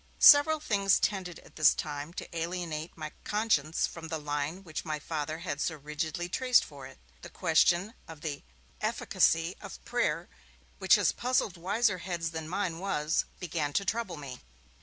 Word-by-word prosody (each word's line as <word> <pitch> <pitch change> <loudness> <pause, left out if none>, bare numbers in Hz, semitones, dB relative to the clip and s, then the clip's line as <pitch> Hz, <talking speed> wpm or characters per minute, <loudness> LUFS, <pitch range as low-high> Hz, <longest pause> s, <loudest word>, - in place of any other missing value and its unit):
Several 305 +2 +8
things 200 -9 +2
tended 185 -4 -1
at - - -18
this 155 -2 +6
time 145 +1 -5
to 170 - -8
alienate 165 -1 -4
my 155 -1 -6
conscience 205 -8 +1
from 165 -1 -7
the 160 0 -3
line 150 +4 -3
which 160 -4 -5
my 155 -2 -2
Father 155 0 -4
had 155 -4 -4
so 160 - -1
rigidly 155 +4 -4
traced 250 +7 +3
for 140 -3 -10
it. - - -15 0.2
The - - -9
question 185 +6 +2
of 160 -2 -11
the 150 -3 -4 0.4
efficacy 165 +2 +1
of - - -10
prayer, - - 0 0.5
which - - +6
has - - +3
puzzled 245 -6 0
wiser 195 +3 +1
heads 170 -3 -3
than 160 -1 -5
mine 180 -3 -2
was, 160 -5 0
began 155 -4 -2
to 195 - +1
trouble 210 -4 -2
me. 135 -4 -8
165 Hz, 165 wpm, -30 LUFS, 155-190 Hz, 0.5 s, Several